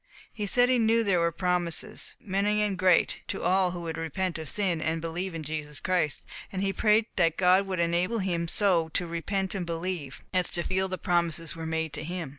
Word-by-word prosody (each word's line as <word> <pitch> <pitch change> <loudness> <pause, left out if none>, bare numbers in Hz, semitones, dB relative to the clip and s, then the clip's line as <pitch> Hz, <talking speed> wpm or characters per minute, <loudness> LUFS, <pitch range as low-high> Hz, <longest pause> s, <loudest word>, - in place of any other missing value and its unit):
He 210 -2 -3
said 245 +4 +5
he 255 -1 +3
knew 230 0 +3
there 195 -5 +2
were 170 0 +2
promises, 180 +3 -1
many 205 +2 +1
and 205 -2 0
great, 185 -1 +3
to - - -4
all 185 0 +3
who 175 -1 -5
would 165 -1 -4
repent 165 +2 -2
of 160 - -6
sin, 185 -6 0
and 160 +1 0
believe 165 +2 -4
in 160 - -4
Jesus 150 -2 -5
Christ, 180 -5 0 0.3
and 190 0 -2
he 195 0 0
prayed 215 +1 +3
that 165 -3 +3
God 185 +2 +4
would 185 -2 -2
enable 175 +6 +1
him 175 -4 -1
so 170 -3 +2
to 180 - +1
repent 185 +3 -2
and 190 -3 -2
believe, 165 -5 -4
as 180 -1 +2
to 175 - -2
feel 190 +1 0
that 185 0 -4
the - - -24
promises 170 -2 +1
were 165 -1 -5
made 160 -1 -2
to 150 - -5
him. 170 -2 -4
180 Hz, 220 wpm, -28 LUFS, 165-195 Hz, 0.3 s, said